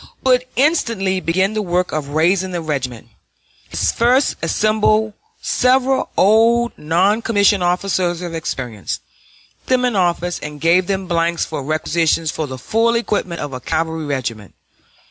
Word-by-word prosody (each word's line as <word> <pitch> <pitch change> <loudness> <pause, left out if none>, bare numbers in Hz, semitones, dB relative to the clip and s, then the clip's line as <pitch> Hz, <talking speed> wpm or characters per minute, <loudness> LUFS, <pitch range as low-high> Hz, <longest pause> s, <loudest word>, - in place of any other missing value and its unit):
Wood 250 -1 +3
instantly 230 - +1
began 185 +4 0
the 215 - -1
work 180 -1 -1
of 150 -2 -3
raising 175 +6 +1
the 175 - -2
regiment. 130 -6 -4 0.6
He - - -7
first 250 +4 +2
assembled 215 +4 +1 0.3
several 260 +1 +2
old 230 +4 +4
non 185 +8 +1
commissioned 205 -3 +2
officers 180 -1 0
of 175 -1 -5
experience, 125 - -4 0.7
put - - -17
them 250 0 +1
in 245 -3 0
office, 175 -1 0
and 150 -1 -8
gave 175 +4 +3
them 195 -1 -2
blanks 170 -1 0
for 155 - -5
requisitions 155 +2 0
for 155 - -4
the 130 -1 -7
full 225 - +1
equipment 205 -7 -2
of 145 -2 -5
a 130 - -5
cavalry 160 +1 -2
regiment. 120 -7 -4
180 Hz, 145 wpm, -18 LUFS, 160-215 Hz, 0.7 s, old